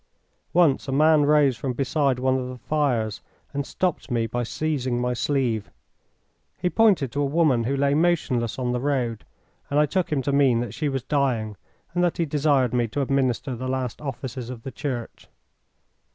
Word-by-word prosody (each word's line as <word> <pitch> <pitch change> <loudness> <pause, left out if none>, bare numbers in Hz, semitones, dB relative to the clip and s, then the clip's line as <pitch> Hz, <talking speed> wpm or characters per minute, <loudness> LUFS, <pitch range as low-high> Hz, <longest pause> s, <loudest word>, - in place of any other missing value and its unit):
Once 165 -7 +3
a - - -2
man 150 +1 +4
rose 145 -3 +4
from 125 +2 -3
beside 135 +1 +1
one 130 +1 +1
of 130 -1 -2
the 130 - -7
fires 125 -8 -1 0.3
and 140 -1 -3
stopped 180 -6 -2
me 120 -2 0
by 120 +2 -2
seizing 130 -1 -1
my 125 0 0
sleeve. 125 -5 -1 0.9
He 180 0 -1
pointed 195 - +3
to 145 - -1
a - - +2
woman 140 -5 +2
who 135 +3 0
lay 140 0 +2
motionless 145 -8 +1
on 125 -2 -1
the 125 - -1
road, 125 -5 -1 0.4
and 145 - +2
I 150 - +5
took 180 +3 -1
him 140 -3 0
to 140 - 0
mean 135 -4 +4
that 120 -4 -5
she 150 -2 -1
was 135 -2 -2
dying, 125 -7 0 0.4
and 175 0 +1
that 175 - +1
he 170 - +1
desired 140 -4 +2
me 120 -1 +1
to 140 +6 -2
administer 130 -1 0
the 130 +2 -5
last 130 -1 -3
offices 130 -3 -5
of 120 -3 -8
the 135 - -6
Church. 125 -5 -5
135 Hz, 190 wpm, -24 LUFS, 125-145 Hz, 0.9 s, I